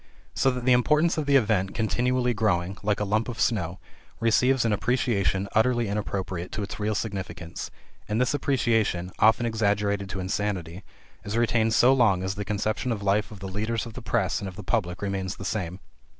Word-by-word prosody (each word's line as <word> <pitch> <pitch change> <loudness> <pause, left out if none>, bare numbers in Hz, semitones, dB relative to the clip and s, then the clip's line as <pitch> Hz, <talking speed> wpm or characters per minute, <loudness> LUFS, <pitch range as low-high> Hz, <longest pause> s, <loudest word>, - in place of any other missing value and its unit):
So 135 - +2
that 125 -1 -3
the 130 - +4
importance 150 +7 +3
of 150 - -3
the 140 - +4
event, 105 -6 +2
continually 125 +2 +1
growing, 95 -4 0
like 105 0 0
a - - 0
lump 110 +4 0
of 120 - -6
snow, 90 -6 0 0.4
receives 125 +2 +3
an 110 - +2
appreciation 100 -4 0
utterly 120 +1 +2
inappropriate 95 -3 -3
to 105 - -2
its 100 - -6
real 105 +1 0
significance, 95 -6 -5 0.4
and 105 +2 0
this 125 +4 +2
appreciation, 115 -10 +1
often 110 +2 +4
exaggerated 100 -3 0
to 95 - -4
insanity, 95 -2 -3 0.4
is 105 +2 -3
retained 115 -1 +2
so 130 +2 +6
long 105 -8 +3
as 95 +1 -1
the 105 +1 -4
conception 105 +4 -1
of 105 -3 -3
life 100 +2 +1
of 105 -3 -11
the 95 - -5
leaders 110 +5 -2
of 115 - -9
the - - -8
press - - 0
and 100 - -5
of 95 - -8
the 105 - -8
public 95 -3 -1
remains 95 -1 -2
the 95 - -8
same. 90 -3 -3
105 Hz, 195 wpm, -26 LUFS, 95-120 Hz, 0.4 s, so